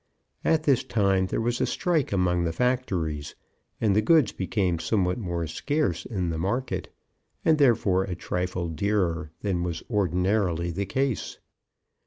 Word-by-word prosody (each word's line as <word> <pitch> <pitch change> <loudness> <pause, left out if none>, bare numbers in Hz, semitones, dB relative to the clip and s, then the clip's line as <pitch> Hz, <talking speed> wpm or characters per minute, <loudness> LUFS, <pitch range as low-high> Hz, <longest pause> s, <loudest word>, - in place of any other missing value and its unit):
At 160 -1 +2
this 140 -5 +3
time 95 -3 +1
there - - -2
was 120 +2 -1
a - - +2
strike 165 -6 0
among 90 -3 +2
the 85 - 0
factories, 90 - -1 0.4
and 105 -3 +2
the 105 - +4
goods 150 -1 +4
became 95 -2 -1
somewhat 90 +3 0
more 85 -5 -2
scarce 145 - -1
in 90 -7 -2
the 80 - -3
market, 95 0 -2 0.5
and, 160 -1 +4
therefore, 100 -8 +3
a 90 - -4
trifle 90 0 -2
dearer 85 -2 0
than 95 -4 -1
was 85 -2 -3
ordinarily 90 -3 +1
the 100 +3 -3
case. 130 +2 -1
95 Hz, 150 wpm, -26 LUFS, 85-115 Hz, 0.5 s, the